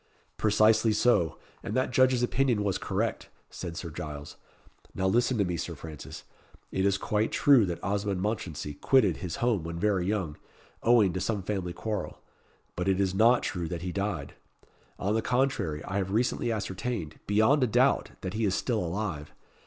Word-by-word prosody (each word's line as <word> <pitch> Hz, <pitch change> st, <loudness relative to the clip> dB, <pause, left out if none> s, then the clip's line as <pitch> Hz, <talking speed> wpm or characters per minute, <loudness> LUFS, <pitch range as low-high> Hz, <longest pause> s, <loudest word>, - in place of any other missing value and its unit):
"Precisely 110 Hz, +1 st, +4 dB
so, 85 Hz, -8 st, +2 dB, 0.2 s
and -, -, -5 dB
that 130 Hz, 0 st, +1 dB
judge's 130 Hz, -1 st, +3 dB
opinion 125 Hz, -4 st, +1 dB
was 100 Hz, -3 st, 0 dB
correct," -, -, -2 dB, 0.2 s
said 85 Hz, -2 st, -6 dB
Sir 85 Hz, -, -5 dB
Giles. 75 Hz, -1 st, -7 dB, 0.6 s
"Now 95 Hz, -, -1 dB
listen 120 Hz, +5 st, +2 dB
to 100 Hz, -, +2 dB
me, 90 Hz, -1 st, -2 dB
Sir 85 Hz, +1 st, -4 dB
Francis. 75 Hz, 0 st, -9 dB, 0.5 s
It 95 Hz, +1 st, +1 dB
is 100 Hz, 0 st, +2 dB
quite 105 Hz, +2 st, 0 dB
true 130 Hz, -8 st, +5 dB
that 85 Hz, -2 st, -5 dB
Osmond 100 Hz, 0 st, -1 dB
Mounchensey 90 Hz, -8 st, -3 dB
quitted 110 Hz, -, +4 dB
his 90 Hz, -2 st, -5 dB
home 115 Hz, -8 st, +1 dB
when 85 Hz, +1 st, -5 dB
very 95 Hz, -1 st, +1 dB
young, 95 Hz, -8 st, -2 dB, 0.4 s
owing 115 Hz, -6 st, +4 dB
to 95 Hz, -, -3 dB
some 100 Hz, +1 st, -1 dB
family 95 Hz, -3 st, -2 dB
quarrel; 105 Hz, +4 st, -4 dB, 0.6 s
but 90 Hz, +2 st, -1 dB
it 95 Hz, 0 st, +2 dB
is 95 Hz, -2 st, +1 dB
not 115 Hz, +5 st, +4 dB
true 85 Hz, -3 st, -2 dB
that 85 Hz, +1 st, -5 dB
he 90 Hz, -, -3 dB
died. 100 Hz, -7 st, -3 dB, 0.6 s
On 100 Hz, +3 st, -1 dB
the 115 Hz, -, +1 dB
contrary, 120 Hz, -, 0 dB
I 95 Hz, -, -3 dB
have 95 Hz, -1 st, -1 dB
recently 115 Hz, +2 st, 0 dB
ascertained, 100 Hz, -4 st, -4 dB
beyond 110 Hz, +8 st, +4 dB
a -, -, +3 dB
doubt, 110 Hz, -, +3 dB
that 95 Hz, 0 st, -4 dB
he 110 Hz, -, -1 dB
is 95 Hz, -2 st, +1 dB
still 115 Hz, +1 st, 0 dB
alive. 85 Hz, -4 st, -4 dB
100 Hz, 175 wpm, -28 LUFS, 90-110 Hz, 0.6 s, true